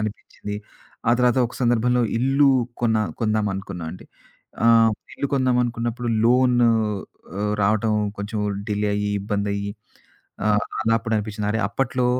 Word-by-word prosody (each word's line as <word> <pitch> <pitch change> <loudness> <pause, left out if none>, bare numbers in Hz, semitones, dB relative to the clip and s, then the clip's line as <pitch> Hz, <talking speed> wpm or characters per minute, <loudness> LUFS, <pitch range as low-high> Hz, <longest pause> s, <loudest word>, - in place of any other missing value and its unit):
అనిపిచ్చింది 105 -1 -5 0.5
ఆ - - +6
తర్వాత, 125 0 +3
ఒక - - -12
సందర్భంలో 120 +1 +2 0.2
ఇల్లు 135 +3 +3 0.3
కొన్న 110 -2 +3 0.2
కొందాం 110 -1 +1
అనుకున్నా 95 -3 -6
అండి. 90 - -11 0.6
ఆహ్, 115 -1 +6 0.2
ఇల్లు - - -2
కొందామనుకున్నప్పుడు 120 -2 0 0.2
లోను 125 0 +4 0.7
ఆహ్, 105 0 0
రావటం 110 +1 +2 0.2
కొంచెం 105 +2 -4 0.3
డిలే 105 0 0
అయ్యి, 105 0 -1
ఇబ్బంది 100 0 -2
అయ్యి. 100 0 -3 0.7
ఆ! - - +1 0.3
అలాప్పుడు 115 0 +1
అనిపించింది. 105 0 -3
అరే! 110 - 0
అప్పట్లో, 125 +3 0
115 Hz, 130 wpm, -23 LUFS, 105-120 Hz, 0.7 s, ఆ